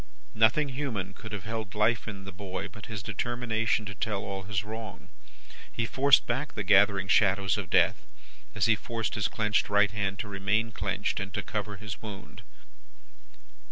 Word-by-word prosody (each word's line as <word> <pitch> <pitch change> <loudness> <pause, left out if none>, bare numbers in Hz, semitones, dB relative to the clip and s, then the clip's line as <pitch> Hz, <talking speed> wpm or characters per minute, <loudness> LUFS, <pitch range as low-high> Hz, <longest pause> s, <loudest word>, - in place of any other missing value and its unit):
"Nothing 120 +7 +4
human 120 -9 -3
could 110 +2 -10
have 105 -3 -5
held 110 -2 -5
life 110 +2 +2
in 100 -3 -6
the 95 - -7
boy 95 -1 -5
but 105 - -11
his 110 -4 -5
determination 115 0 -1
to 100 - -5
tell 100 0 -2
all 95 -1 -4
his 95 -1 -2
wrong. 110 +1 -7 0.6
He 115 - -1
forced 135 +3 +5
back 135 +4 -2
the 105 - -2
gathering 100 -1 +5
shadows 100 -2 +3
of 100 -4 -4
death, - - +4 0.5
as 105 -2 +2
he 115 -1 +5
forced 115 -1 -3
his 105 -4 +1
clenched 105 -1 +1
right 105 0 +4
hand 100 -2 -1
to 110 - -4
remain 105 +3 0
clenched, - - -1
and 95 -1 -4
to - - -2
cover 105 -1 -4
his 100 -1 -7
wound. 100 -8 -9
105 Hz, 175 wpm, -29 LUFS, 100-115 Hz, 0.6 s, forced